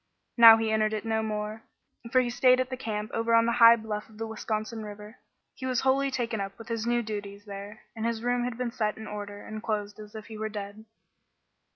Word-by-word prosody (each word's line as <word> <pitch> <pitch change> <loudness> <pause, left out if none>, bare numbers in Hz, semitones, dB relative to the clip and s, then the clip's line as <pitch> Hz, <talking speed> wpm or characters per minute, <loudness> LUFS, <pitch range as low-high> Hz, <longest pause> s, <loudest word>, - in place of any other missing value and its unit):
Now 230 -2 +10
he 225 -1 -1
entered 215 0 +1
it 215 +1 -3
no 220 0 0
more, 215 0 -4 0.5
for 255 - +5
he 240 -1 -2
stayed 255 +1 +4
at 255 0 -1
the - - -1
camp 215 -4 -4
over 230 0 +2
on 230 0 +5
the 235 - +2
high 230 0 +10
bluff 215 -2 -5
of 215 - -17
the 225 - -3
Wisconsin 220 0 -4
River. 210 +1 -10 0.4
He 260 - -6
was 255 -2 +1
wholly 270 +1 +2
taken 235 -5 -2
up 195 0 -6
with 230 +1 -11
his 230 0 -2
new 240 0 +1
duties 205 -1 -6
there, 200 +1 -8
and 220 - -5
his 230 -1 -1
room 245 0 +1
had 245 -1 -3
been 250 -1 -2
set 215 -2 -1
in 220 - -8
order 205 -1 -7
and 215 0 -7
closed 210 -2 -3
as 210 0 -11
if 215 -1 -7
he 220 -2 -9
were 220 0 -2
dead. 205 +1 -7
220 Hz, 235 wpm, -28 LUFS, 210-235 Hz, 0.5 s, Now